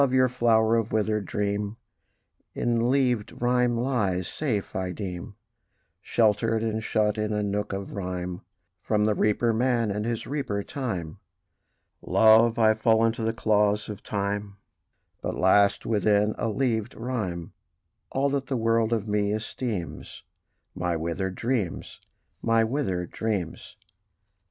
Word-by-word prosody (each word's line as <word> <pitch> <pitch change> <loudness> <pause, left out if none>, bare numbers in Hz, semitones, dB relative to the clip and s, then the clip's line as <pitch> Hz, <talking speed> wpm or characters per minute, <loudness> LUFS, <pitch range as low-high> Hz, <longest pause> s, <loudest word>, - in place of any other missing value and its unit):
your 130 0 +4
flower 115 -2 +3
of 115 -1 -1
withered 105 -2 0
dream 105 +1 -2 0.8
In 120 -1 +1
leavèd 125 -5 +1
rhyme 125 0 +2
lies 105 -8 0
safe, 120 -10 -3
I 95 -1 -2
deem, 90 -2 -6 0.7
Sheltered 110 0 +2
and 110 -1 -2
shut 105 0 +1
in 105 0 -1
a 105 0 0
nook 105 +1 -2
of 100 0 -5
rhyme, 90 -2 -4 0.4
From 105 0 +1
the 105 - +3
reaper 110 +3 +2
man, 120 -2 +1
and 105 +1 -2
his 115 0 -2
reaper 130 -8 -2
Time. 95 - -4 0.8
Love! 110 +1 +5
I 110 -1 +5
fall 110 +1 +3
into 115 +1 0
the 110 0 +1
claws 105 -2 +1
of 105 - -6
Time: 100 0 -3 0.6
But - - -3
lasts 100 +2 +4
within 105 0 +2
a - - -2
leavèd 110 -1 -1
rhyme 105 -9 -3 0.6
All 135 +1 +1
that 140 -1 -2
the 130 - -1
world 115 0 +2
of 110 -2 0
me 105 -1 +1
esteems 110 -3 -4 0.5
My 90 -2 -1
withered 90 +4 -3
dreams, 115 -7 -2 0.4
my 115 0 +3
withered 110 - -2
dreams. 105 -7 -3
110 Hz, 135 wpm, -26 LUFS, 100-115 Hz, 0.8 s, Love